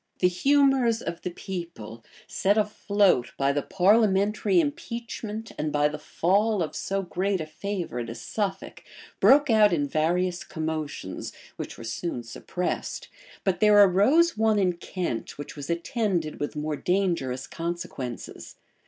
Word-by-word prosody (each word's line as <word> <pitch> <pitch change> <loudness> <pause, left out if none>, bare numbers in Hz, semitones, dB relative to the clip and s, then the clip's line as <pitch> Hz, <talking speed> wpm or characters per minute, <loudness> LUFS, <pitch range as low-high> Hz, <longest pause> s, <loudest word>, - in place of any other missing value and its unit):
The 180 - +4
humors 265 +3 +3
of 170 0 -5
the - - -3
people, 170 - -7 0.2
set 200 +2 +1
afloat 205 - +2
by 135 0 +2
the 145 +1 0
parliamentary 200 +1 +3
impeachment, 220 +6 -4
and 150 0 -1
by 150 0 +2
the 150 0 -6
fall 200 +5 +1
of 155 - -5
so 195 0 -2
great 185 +3 -1
a 155 - -3
favorite 155 - -4
as 115 - -7
Suffolk, 195 -3 -4 0.4
broke 285 -1 +6
out 215 -2 +6
in 145 -4 +1
various 175 +4 0
commotions, 155 - -5 0.2
which - - -7
were 115 - -9
soon 120 +3 -4
suppressed, 175 +9 -4 0.3
but 190 -2 0
there 210 -1 +6
arose 205 - +5
one 220 -1 +2
in 185 -3 +2
Kent 175 -7 -4
which 145 - -8
was 145 0 -7
attended 170 -2 -1
with 145 - -3
more 150 0 -2
dangerous 170 -8 0
consequences. 165 -8 -6
180 Hz, 140 wpm, -26 LUFS, 155-205 Hz, 0.4 s, broke